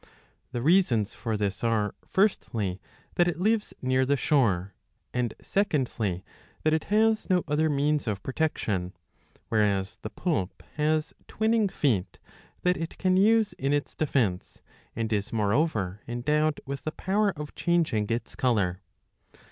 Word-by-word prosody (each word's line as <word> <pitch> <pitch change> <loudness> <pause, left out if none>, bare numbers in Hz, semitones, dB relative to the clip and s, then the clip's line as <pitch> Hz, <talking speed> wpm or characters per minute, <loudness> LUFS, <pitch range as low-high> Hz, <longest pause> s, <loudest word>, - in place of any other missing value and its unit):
The 120 -2 -3
reasons 135 - +3
for 110 -2 -2
this 100 0 -2
are, 110 -3 +1
firstly, 110 - 0 0.4
that 175 - +5
it 170 -2 -1
lives 215 +3 +1
near 130 0 +2
the 140 +2 +2
shore, 100 - +2 0.4
and, 125 -3 -1
secondly, 120 - 0 0.4
that 155 - +3
it 160 - 0
has 220 +1 +2
no 180 -2 +3
other 155 +2 +2
means 145 -1 +1
of 100 -3 -2
protection; 105 - -1 0.6
whereas 100 -2 +1
the 110 - -5
poulp 115 - -2
has 155 +1 0
twining 220 -1 +2
feet 115 - 0
^* - - -24 0.3
that 180 0 +3
it 165 0 -5
can 185 0 +2
use 220 +2 +4
in 135 +2 +1
its 145 0 -1
defence, 120 -12 -1 0.3
and 115 0 -1
is 105 -1 -1
moreover 105 - 0
endowed 150 +6 +1
with 140 0 -5
the 155 - -3
power 205 +2 +1
of 150 0 -6
changing 165 -12 +1
its 115 +1 -2
colour.' 100 -7 +1
135 Hz, 145 wpm, -27 LUFS, 105-165 Hz, 0.6 s, that